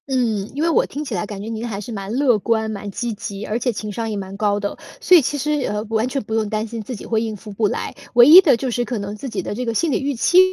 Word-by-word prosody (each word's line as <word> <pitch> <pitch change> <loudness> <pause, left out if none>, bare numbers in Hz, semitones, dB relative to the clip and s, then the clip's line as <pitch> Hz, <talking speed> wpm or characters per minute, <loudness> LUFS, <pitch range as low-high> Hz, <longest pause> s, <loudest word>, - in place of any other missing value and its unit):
嗯， 230 -7 0
因 295 - -1
为 335 - +2
我 330 - +3
听 295 +2 -6
起 260 - -5
来 180 0 -1
感 205 -1 -7
觉 210 - -7
您 225 +1 -4
还 200 -4 -4
是 210 +3 -7
蛮 200 -2 -5
乐 250 -2 +3
观、 220 +1 0
蛮 205 -1 -6
积 235 +4 -3
极， 205 0 -6
而 220 +3 -2
且 245 +1 0
情 210 -1 -5
商 225 +2 -3
也 210 - -3
蛮 195 0 -6
高 205 0 +1
的， 200 0 -3 0.2
所 365 - +5
以 340 - +8
其 290 +2 -2
实， 300 +2 -1 0.2
呃， 210 0 -2
完 225 +1 +1
全 275 +1 -2
不 220 - -6
用 220 -2 0
担 215 0 -1
心 230 0 -6
自 245 +4 -6
己 - - -9
会 220 -1 0
应 220 -1 -3
付 210 +1 -11
不 210 +1 +1
来。 - - -4 0.2
唯 240 0 +8
一 340 +5 +11
的 295 -10 +4
就 260 0 -3
是 240 +1 0
可 240 0 -3
能 200 0 -5
自 260 +5 -6
己 - - -3
的 - - -4
这 245 +4 -3
个 230 -2 -2
心 325 +6 +1
里 - - +1
预 280 +1 -1
期， 355 +9 +4
225 Hz, 340 characters per minute, -20 LUFS, 210-250 Hz, 0.2 s, 一